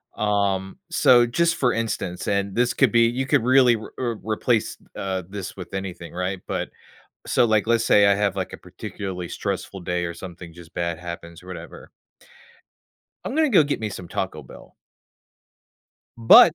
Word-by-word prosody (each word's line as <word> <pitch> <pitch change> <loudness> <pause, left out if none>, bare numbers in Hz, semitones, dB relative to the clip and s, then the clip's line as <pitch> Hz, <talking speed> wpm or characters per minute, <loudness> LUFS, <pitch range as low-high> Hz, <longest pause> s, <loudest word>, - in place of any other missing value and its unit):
Um, 100 -2 0
so, 125 -7 +6
just, 165 +8 +1
for 125 -2 +2
instance, 110 -6 -3
and 100 -1 0
this 120 0 +2
could 135 -5 +3
be 115 - +5
you 125 +3 -1
could 130 - +2
really 125 -1 +5
w 110 -1 -8
uh, 120 -2 -1
replace, 110 +1 0 0.2
uh, 95 -1 -3
this 100 -1 -6
with 90 0 -9
anything, 95 -3 -6
right, 90 +1 -2
but - - -2 0.6
so, - - +3
like, 110 -1 +2
let's 115 -1 +2
say 100 -1 +6
I 100 - +5
have, 100 -2 0
like, 95 - -3
a - - -6
particularly 90 -3 -6
stressful 95 +2 -4
day 90 0 -1
or 85 - -4
something, 90 -1 -10
just, 85 0 -14
bad 85 -1 -2
happens, 85 -1 -8
whatever. 90 -1 -10 1.3
I'm - - -4
gonna 315 0 +3
go 190 -9 +6
get 145 -4 -2
me 110 - -2
some 90 -3 -8
Taco - - -3
Bell - - -14 1.4
but 120 +8 +8
100 Hz, 170 wpm, -23 LUFS, 90-120 Hz, 1.4 s, but